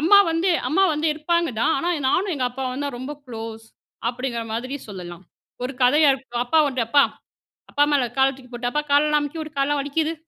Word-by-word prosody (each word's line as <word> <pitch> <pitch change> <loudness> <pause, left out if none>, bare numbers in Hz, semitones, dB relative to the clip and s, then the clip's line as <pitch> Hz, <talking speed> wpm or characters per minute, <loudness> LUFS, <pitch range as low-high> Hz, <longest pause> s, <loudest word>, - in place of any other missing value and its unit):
அம்மா 375 +7 +7
வந்து 330 +3 +1 0.2
அம்மா 385 +5 +3
வந்து 300 +2 -1
இருப்பாங்க 340 +2 0
தான். - - +3
ஆனா 335 +6 -1 0.2
நானும் 375 +5 +1
எங்க 260 - -1
அப்பாவும் 260 +2 -4
தான் 280 -4 -4
ரொம்ப 265 +4 -5
குளோஸ் 225 -1 -7 0.4
அப்படிங்கிற 245 -1 -3
மாதிரி 255 +4 -3
சொல்லலாம். 180 -2 -8 0.4
ஒரு 255 - -2
கதையா 290 +4 +5
இரு 265 - -9 0.2
அப்பா 315 +6 +2
வந்து 260 -2 -2
அப்பா! 280 +4 +5 0.7
அப்பா 290 - +3
மேல 280 -3 +3
கால 265 0 +5
தூக்கிப்போட்டு, 245 -2 -5
"அப்பா 300 - 0
காலெல்லாம் 300 +1 +4
அமுக்கி 290 +3 -5
விடு, 310 -1 -6
காலெல்லாம் 285 +1 +1
வலிக்குது" 310 +3 -1
280 Hz, 185 wpm, -23 LUFS, 250-305 Hz, 0.7 s, அம்மா